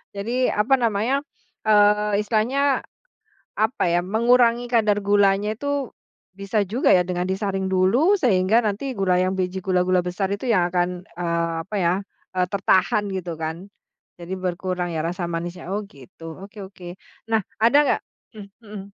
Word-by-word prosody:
jadi 240 +6 0
apa 215 +6 +1
namanya, 235 +3 0 0.4
eee, 210 -1 +3
istilahnya 240 +7 +1 0.8
apa 220 +6 0
ya, 175 +1 +2
mengurangi 235 +2 +3
kadar 210 -3 +2
gulanya 205 +1 +2
tuh 285 -2 -2 0.5
bisa 200 +2 -1
juga 235 +7 +3
ya 180 - +5
dengan 180 0 -3
disaring 190 0 -2
dulu 190 - +3
sehingga 215 -1 +3
nanti 215 +6 -2
gula 190 -4 +1
yang 185 +1 +1
biji 185 0 -2
gula-gula 185 0 +2
besar 190 +2 -2
itu 205 +6 -3
yang 185 -7 +2
akan, 175 0 +1 0.3
eee, 170 -1 -1
apa 205 +4 -9
ya, 170 0 +2 0.4
eee, 180 0 +2
tertahan 195 +1 +2
gitu 180 -3 -4
kan, 160 +4 -5 0.5
jadi 170 +2 -7
berkurang 180 -1 -3
ya 160 - -1
rasa 175 +2 -3
manisnya. 170 +1 -5
Oh 205 - -1
gitu, 140 +2 -16 0.2
oke 205 +2 -14
oke 185 -2 -13 0.4
nah 225 - +3 0.2
ada 235 +5 +5
nggak - - +1 0.4
mmm, 200 -2 -10
mhm. 205 -2 -9
200 Hz, 150 wpm, -23 LUFS, 180-220 Hz, 0.8 s, ya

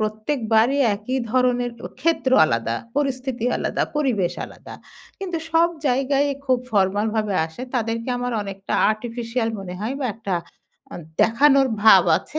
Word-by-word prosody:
প্রত্যেকবারই 220 +3 +1 0.2
একই 220 +6 -3
ধরনের 245 0 +1
ও - - -3
ক্ষেত্র 320 -3 +1 0.2
আলাদা, 115 -4 -1 0.2
পরিস্থিতি 260 -4 -2
আলাদা, - - -1
পরিবেশ 235 -12 +1
আলাদা। - - -12 0.4
কিন্তু 375 -4 -4
সব 330 +1 +4 0.2
জায়গায়ই 275 +2 +1
খুব 260 -2 +2
ফরমাল 200 +1 +2
ভাবে 215 -3 0
আসে, 160 +10 -10
তাদেরকে 230 0 -2
আমার 245 0 -2
অনেকটা 195 -1 -7 0.2
artificial 230 +1 -3
মনে 185 -2 -7
হয় 225 +5 -2
বা 265 - 0
একটা 220 -3 -5 0.6
আ - - -7 0.3
দেখানোর 270 +3 +4
ভাব 205 -4 +8
আছে 310 - -5
240 Hz, 140 wpm, -22 LUFS, 215-270 Hz, 0.6 s, ভাব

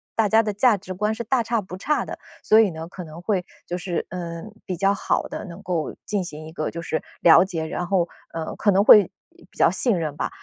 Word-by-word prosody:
大 225 -2 +3
家 220 +2 +4
的 210 - -1
价 215 +3 +4
值 185 -1 -7
观 210 +3 -1
是 235 - -4
大 245 +2 +1
差 230 -1 -1
不 185 -1 -9
差 300 +10 0
的。 - - -7 0.2
所 220 - +5
以 215 -3 +5
呢， 160 0 -7
可 180 -1 -8
能 160 +2 -10
会 185 -2 -1 0.2
就 175 - -4
是， 180 -1 -3
嗯， 175 +3 -6
比 185 - -3
较 195 +3 +2
好 - - 0
的 - - -6
能 180 +2 -10
够 170 -5 -2
进 205 -3 -1
行 155 -2 -8
一 - - -10
个 155 -1 -3
就 170 - -6
是 160 - -2 0.2
了 170 +1 +7
解， 165 -4 -4
然 175 +2 -4
后， 180 -3 +2 0.3
呃， 165 -1 -4
可 205 - +1
能 200 +1 +4
会 210 -1 +8 0.4
比 - - -22
较 - - +4
信 235 -8 +1
任 155 -3 -3
吧。 - - -2
185 Hz, 265 characters per minute, -23 LUFS, 170-210 Hz, 0.4 s, 会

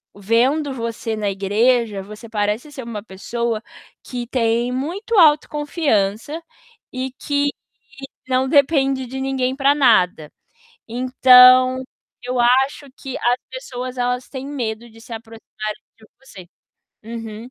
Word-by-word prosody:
"Vendo 255 +8 +1
você 230 -2 -4
na 210 -2 -1
igreja, 210 +2 +1
você 210 +3 -11
parece 210 +5 -2
ser 265 -3 -8
uma 230 -3 -6
pessoa 230 +3 -3 0.4
que 245 -2 -6
tem 235 0 0
muito 375 - -2
autoconfiança 295 - +1 0.5
e 255 +1 -3
que 285 0 0 0.8
não 260 0 +1
depende 275 -2 +2
de 265 +2 -6
ninguém 265 -1 -1
para 275 +1 +3
nada. 185 - +3 0.6
Então, 255 +1 +6 0.4
eu 250 0 -2
acho 265 +4 +2
que 265 -2 -6
as 240 +1 +2
pessoas 255 -1 -7
elas 250 +1 -1
têm 265 -1 -6
medo 235 -5 -4
de 225 - -17
se 230 - -12
aproximarem 225 -1 -7 0.2
de 220 - -18
você". 195 -10 -14 0.6
Uhum. 225 0 -8
250 Hz, 125 wpm, -20 LUFS, 225-265 Hz, 0.8 s, Então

